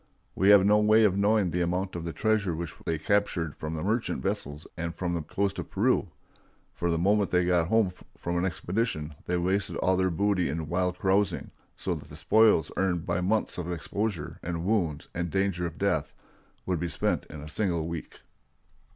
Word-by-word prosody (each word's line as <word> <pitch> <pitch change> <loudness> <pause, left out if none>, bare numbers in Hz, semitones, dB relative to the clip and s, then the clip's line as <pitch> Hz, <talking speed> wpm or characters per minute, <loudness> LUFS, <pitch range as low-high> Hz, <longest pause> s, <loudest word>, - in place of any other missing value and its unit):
We 95 +2 +3
have 100 -2 +8
no 105 +1 +5
way 110 +1 +5
of 100 -3 +4
knowing 100 -2 +2
the 90 - 0
amount 90 +2 -1
of 85 -1 -4
the 85 - -3
treasure 105 -3 +1
which 85 -2 -5
they 80 - +1
captured 85 -3 0
from 80 +1 -5
the 75 - -4
merchant 110 +4 -1
vessels 75 -7 -3
and 85 -1 -4
from 90 0 -2
the 85 - -1
coast 100 +6 -2
of - - -6
Peru; 105 -1 +1 0.6
for 85 - -1
the 85 - +1
moment 100 +3 +2
they 90 -1 +2
got 85 -2 +2
home 110 -2 +3 0.3
from 85 - -3
an 85 - +1
expedition 90 -3 -2
they 90 - +1
wasted 95 +3 0
all 95 - +2
their 95 0 +2
booty 90 -1 +1
in 80 +1 -3
wild 90 +2 0
carousing, 95 +2 +1 0.2
so - - -2
that - - -8
the - - -10
spoils 110 -6 +4
earned 90 -3 0
by 85 0 0
months 105 +1 0
of 90 0 -3
exposure, 90 0 -3
and 85 0 -3
wounds, 90 -8 0
and 85 0 -2
danger 95 -1 0
of 80 - -9
death, - - 0 0.5
would 90 -3 0
be 85 +1 -2
spent - - -1
in 75 - -9
a 75 - -8
single 85 0 -1
week. 85 -2 -7
90 Hz, 200 wpm, -28 LUFS, 85-100 Hz, 0.6 s, have